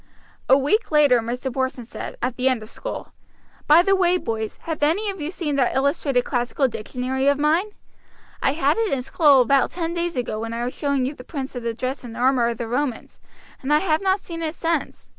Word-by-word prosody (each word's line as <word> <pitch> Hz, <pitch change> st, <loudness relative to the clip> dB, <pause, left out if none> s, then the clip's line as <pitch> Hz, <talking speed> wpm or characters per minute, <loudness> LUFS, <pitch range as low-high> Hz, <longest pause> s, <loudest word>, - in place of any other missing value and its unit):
A 265 Hz, -, +7 dB
week 295 Hz, -, +1 dB
later 290 Hz, -5 st, +5 dB
Mr. 245 Hz, +3 st, -4 dB
Porson 260 Hz, -2 st, -2 dB
said, -, -, -7 dB
at 250 Hz, 0 st, -1 dB
the 260 Hz, +1 st, +2 dB
end 250 Hz, -4 st, -1 dB
of 215 Hz, -, -11 dB
school: -, -, -7 dB, 0.5 s
"By 315 Hz, +4 st, +7 dB
the 390 Hz, +1 st, +3 dB
way, 365 Hz, -1 st, +3 dB
boys, 220 Hz, -8 st, -4 dB
have 320 Hz, -2 st, -4 dB
any 375 Hz, +8 st, +2 dB
of 380 Hz, -4 st, -9 dB
you 295 Hz, -, -3 dB
seen 315 Hz, -6 st, -2 dB
that 255 Hz, -3 st, +1 dB
illustrated 275 Hz, -2 st, +1 dB
classical 250 Hz, +2 st, 0 dB
dictionary 255 Hz, +3 st, -3 dB
of 285 Hz, 0 st, +4 dB
mine? 310 Hz, +7 st, +2 dB, 0.7 s
I 270 Hz, -, +2 dB
had 290 Hz, +2 st, +1 dB
it 445 Hz, -3 st, 0 dB
in 260 Hz, -2 st, -1 dB
school 280 Hz, -1 st, +5 dB
about 270 Hz, +2 st, +3 dB
ten 335 Hz, -1 st, -3 dB
days 345 Hz, 0 st, -2 dB
ago 235 Hz, -3 st, -2 dB
when 225 Hz, +1 st, -4 dB
I 235 Hz, +1 st, -3 dB
was 250 Hz, -, -3 dB
showing 280 Hz, -3 st, 0 dB
you 270 Hz, -, -2 dB
the 250 Hz, -, -12 dB
prints 270 Hz, -1 st, -6 dB
of 245 Hz, -, -4 dB
the 230 Hz, -1 st, -3 dB
dress 255 Hz, +3 st, -4 dB
and 230 Hz, -2 st, -8 dB
armor 250 Hz, -1 st, +3 dB
of 235 Hz, -1 st, -2 dB
the 235 Hz, -, -4 dB
Romans, 250 Hz, 0 st, -3 dB, 0.4 s
and 275 Hz, -, -3 dB
I 300 Hz, -, +6 dB
have 315 Hz, -1 st, +1 dB
not 385 Hz, 0 st, +2 dB
seen 335 Hz, -3 st, -7 dB
it 320 Hz, 0 st, -3 dB
since. 330 Hz, -2 st, -2 dB
275 Hz, 225 wpm, -23 LUFS, 250-325 Hz, 0.7 s, A